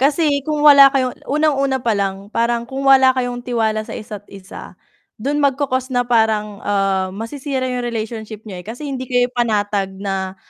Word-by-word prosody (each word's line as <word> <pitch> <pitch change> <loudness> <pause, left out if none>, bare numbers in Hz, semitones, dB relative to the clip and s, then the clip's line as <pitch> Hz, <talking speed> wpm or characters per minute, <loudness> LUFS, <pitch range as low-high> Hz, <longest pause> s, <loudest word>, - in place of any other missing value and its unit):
Kasi 285 +1 +2
kung 300 +1 -2
wala 280 -2 +9
kayong 260 -2 0 0.2
unang 305 +2 +2
una 270 -1 +1
palang 200 -2 -2
parang 235 0 0
kung 265 +2 -6
wala 265 -1 +6
kayong 245 -1 -3
tiwala 220 -3 -1
sa - - -9
isa't 210 -1 -8
isa 195 0 -11 0.4
dun 280 +6 -2
magco 280 -1 +1
cause 255 0 -2
na 245 - +3
parang, 220 -4 +1
ah, 195 -2 +1
masisira 260 +4 -4
yung 250 -1 -3
relationship 220 -2 -5
niyo. 200 -5 -8
Eh, 180 - -11
kasi 230 +6 -8
hindi 270 -3 -4
kayo 245 0 +1
panatag 205 -5 -1
na, 190 -1 -4
240 Hz, 175 wpm, -19 LUFS, 210-265 Hz, 0.4 s, wala